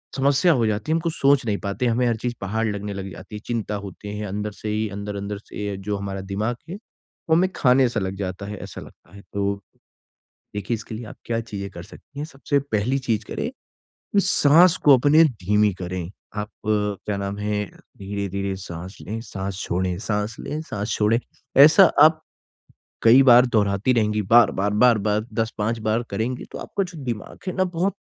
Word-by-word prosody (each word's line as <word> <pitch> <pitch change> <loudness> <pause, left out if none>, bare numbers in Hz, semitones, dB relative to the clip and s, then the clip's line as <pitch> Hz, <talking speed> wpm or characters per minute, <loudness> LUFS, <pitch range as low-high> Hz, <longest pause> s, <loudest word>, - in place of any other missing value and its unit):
समस्या 140 +5 +3
हो 120 -5 +2
जाती 110 +8 -2
है - - +4
हम - - +2
कुछ 165 -1 -2
सोच 140 -2 +3
नहीं 105 -3 0
पाते, 100 +5 -2
हमें 120 +2 +2
हर 120 - +1
चीज़ 120 +2 -3
पहाड़ 110 +4 -1
लगने 100 -1 -3
लग 95 0 -5
जाती 105 - -10
है। - - -5
चिंता 115 -3 -2
होती 100 +1 -7
है 105 - -4
अंदर 105 +2 -3
से 105 +1 -7
ही 110 +1 0
अंदर 100 +1 -5
अंदर 100 +1 -4
से 100 0 -6
जो 100 +1 -3
हमारा 100 -1 -4
दिमाग 100 +5 -2
है 180 - -5 0.5
वो 160 - +5
हमें 185 +3 +3
खाने 130 0 +4
सा 115 - -2
लग 95 -1 -3
जाता 95 0 -4
है, 105 +1 -6
ऐसा - - -8
लगता 90 - -16
है। 100 - -11
तो, 100 0 -1 0.9
देखिए 105 +3 -1
इसके 115 0 -8
लिए 115 +2 -7
आप - - -10
क्या 115 -1 -1
चीजें 100 -3 -6
कर 85 - -9
सकती 140 +8 -13
हैं? 150 - -3
सबसे 140 -1 -1
पहली 130 -1 -1
चीज 110 -2 +1
करें, - - -4 0.7
साँस 175 -1 +5
को 140 -3 +8
अपने 145 +5 +5
धीमी 105 - +2
करें। 90 -1 -4 0.3
आप 105 0 -3 0.2
क्या 105 -1 -1
नाम 100 0 -3
है 105 0 -1 0.3
धीरे-धीरे 100 -1 -3
साँस 90 0 -8
लें, 110 +3 -5
साँस 100 -3 -5
छोड़ें 90 0 -1
साँस 105 0 -2
लें, 150 - -4
साँस 105 -7 -4
छोड़ें। 110 +2 +3 0.4
ऐसा 155 +6 +8 0.2
आप 155 0 +5 0.8
कई 120 +4 +7
बार 125 -1 +7
दोहराती 105 0 +2
रहेंगी 105 -3 +1
बार-बार, 105 -1 +4
बार-बार 110 -1 +3
10-5 115 0 -1
बार 110 +2 +1
करेंगी 115 +5 -2
तो - - -6
आपका 200 - -3
जो 180 -3 -10
दिमाग 115 -4 -5
है - - -1
ना 185 - +3
बहुत 180 +2 -1
105 Hz, 190 wpm, -23 LUFS, 100-125 Hz, 0.9 s, को